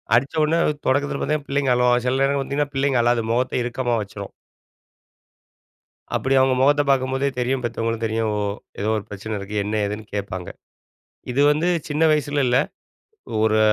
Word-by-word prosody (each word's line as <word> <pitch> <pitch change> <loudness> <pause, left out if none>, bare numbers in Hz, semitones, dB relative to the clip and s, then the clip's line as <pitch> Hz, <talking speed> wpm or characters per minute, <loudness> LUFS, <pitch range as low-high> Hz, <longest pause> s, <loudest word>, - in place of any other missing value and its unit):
அடிச்சவோன்னே, 155 +6 +2 0.3
தொடக்கத்தில 140 +1 +1
பாத்தீங்கன் 150 -1 -1
பிள்ளைங்க 140 -2 +2
அழுவாங்க. 125 0 +3
சில 130 +1 +1
நேரம் 140 0 +1
பாத்தீங்கன்னா, 145 +1 -2
பிள்ளைங்க 135 -2 +2
அழாது. 120 -1 +2
மொகத்த 125 0 0
இறுக்கமா 120 0 -1
வச்சிரும். 100 -1 -9 1.8
அப்படி 135 +1 0
அவங்க 130 0 +3
முகத்த 145 +2 +4
பார்க்கும்போதே 135 +1 +1
தெரியும், 125 +1 0
பெத்தவங்களும் 115 -1 -2
தெரியும், 110 0 0
ஓ - - -1 0.4
ஏதோ 105 +2 -1
ஒரு 105 - -4
பிரச்சனை 105 +2 -6
இருக்கு 100 +2 -7
என்ன 105 - -2
ஏதுன்னு 105 +1 -5
கேட்பாங்க. 95 -3 -4 0.8
இது 135 - +1
வந்து 155 +4 0 0.2
சின்ன 150 +2 +1
வயசுலன்னு 145 -2 +1
இல்ல. 125 +1 +3 0.9
ஒரு 110 0 +3
125 Hz, 150 wpm, -22 LUFS, 110-140 Hz, 1.8 s, முகத்த